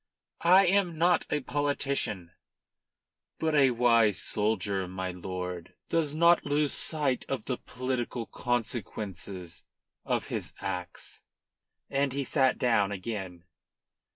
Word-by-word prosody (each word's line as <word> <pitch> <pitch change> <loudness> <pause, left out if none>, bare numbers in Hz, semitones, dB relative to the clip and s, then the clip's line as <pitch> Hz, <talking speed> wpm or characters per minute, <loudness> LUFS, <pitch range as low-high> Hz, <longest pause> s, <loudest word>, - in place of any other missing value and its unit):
"I 190 +2 +8
am 180 -3 +2
not 175 +2 +3
a 150 - 0
politician." 140 - -1 1.1
"But 160 -1 0
a 140 -3 +6
wise 115 -4 +4
soldier, 100 -3 0
my 95 0 -4
lord, 90 -1 -6
does 155 -3 0
not 170 +2 +5
lose 145 0 +1
sight 145 -5 -1
of 130 -5 -2
the 125 - -2
political 125 -2 -3
consequences 100 -8 -4 0.4
of - - -1
his - - -4
acts." 90 -2 -5 0.7
And 135 -1 0
he 140 0 -1
sat 130 0 +2
down 110 -6 +2
again. 95 -3 -5
120 Hz, 115 wpm, -29 LUFS, 95-145 Hz, 1.1 s, I